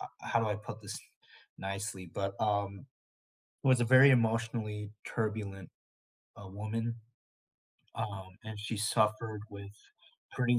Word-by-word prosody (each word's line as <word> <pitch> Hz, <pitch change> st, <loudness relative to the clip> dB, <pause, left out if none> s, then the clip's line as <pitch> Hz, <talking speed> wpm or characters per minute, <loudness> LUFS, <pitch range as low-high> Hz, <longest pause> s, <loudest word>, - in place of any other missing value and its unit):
uh -, -, -4 dB, 0.2 s
How 115 Hz, -, +2 dB
do 115 Hz, -, +1 dB
I 105 Hz, -2 st, +1 dB
put 105 Hz, +1 st, -8 dB
this 105 Hz, +1 st, -5 dB, 0.6 s
nicely? 95 Hz, -1 st, -4 dB
But, 100 Hz, 0 st, -1 dB
um, 100 Hz, 0 st, 0 dB, 0.8 s
it -, -, +1 dB
was 130 Hz, -2 st, +6 dB
a 120 Hz, -, +5 dB
very 130 Hz, +3 st, +9 dB
emotionally 115 Hz, -3 st, +1 dB, 0.2 s
turbulent, 105 Hz, -5 st, -2 dB, 0.7 s
uh, 100 Hz, -2 st, -9 dB
woman, 110 Hz, +4 st, -2 dB, 1.0 s
um, 100 Hz, -4 st, -4 dB, 0.2 s
and 110 Hz, -1 st, -6 dB
she 110 Hz, +1 st, -3 dB
suffered 110 Hz, 0 st, +2 dB
with 100 Hz, -1 st, -8 dB, 0.6 s
pretty 125 Hz, -1 st, +3 dB
105 Hz, 130 wpm, -33 LUFS, 100-115 Hz, 1.0 s, very